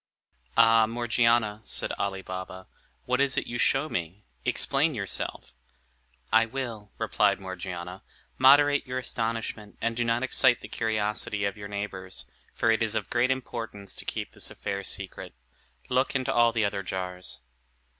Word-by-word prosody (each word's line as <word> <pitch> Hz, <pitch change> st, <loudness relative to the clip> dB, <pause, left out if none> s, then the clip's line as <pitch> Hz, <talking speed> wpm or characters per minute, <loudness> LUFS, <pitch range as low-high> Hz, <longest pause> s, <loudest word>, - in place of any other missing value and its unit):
"Ah, 115 Hz, -1 st, +6 dB
Morgiana," 115 Hz, -2 st, +2 dB
said -, -, -2 dB
Ali 95 Hz, -1 st, -2 dB
Baba, 95 Hz, 0 st, -6 dB, 0.4 s
"what 125 Hz, +2 st, +1 dB
is 140 Hz, -1 st, +2 dB
it -, -, +1 dB
you 120 Hz, 0 st, -4 dB
show 135 Hz, +5 st, +3 dB
me? 90 Hz, -, -4 dB, 0.2 s
Explain 140 Hz, +2 st, +1 dB
yourself." 100 Hz, -4 st, -3 dB, 0.8 s
"I 115 Hz, 0 st, +6 dB
will," 115 Hz, -5 st, -5 dB
replied -, -, +2 dB
Morgiana. 95 Hz, -1 st, -6 dB, 0.4 s
"Moderate 145 Hz, +2 st, +6 dB
your 125 Hz, 0 st, -3 dB
astonishment, 115 Hz, -4 st, -3 dB
and 115 Hz, 0 st, -1 dB
do 120 Hz, -, +1 dB
not 115 Hz, +1 st, +1 dB
excite 130 Hz, -2 st, +4 dB
the -, -, -8 dB
curiosity 105 Hz, -2 st, -1 dB
of 100 Hz, -, -1 dB
your 105 Hz, -1 st, -7 dB
neighbors; 100 Hz, -2 st, -5 dB, 0.3 s
for 115 Hz, -, +3 dB
it 110 Hz, -, +2 dB
is 110 Hz, -1 st, +1 dB
of 105 Hz, -4 st, -2 dB
great 120 Hz, +1 st, +3 dB
importance 115 Hz, -6 st, -3 dB
to -, -, -8 dB
keep -, -, -4 dB
this -, -, -3 dB
affair 100 Hz, 0 st, -4 dB
secret. 95 Hz, -7 st, -4 dB, 0.5 s
Look 130 Hz, +2 st, +1 dB
into 130 Hz, 0 st, +1 dB
all 120 Hz, -1 st, +5 dB
the 115 Hz, -2 st, +1 dB
other 100 Hz, -1 st, -1 dB
jars." 90 Hz, -6 st, -5 dB
110 Hz, 155 wpm, -28 LUFS, 100-120 Hz, 0.8 s, Ah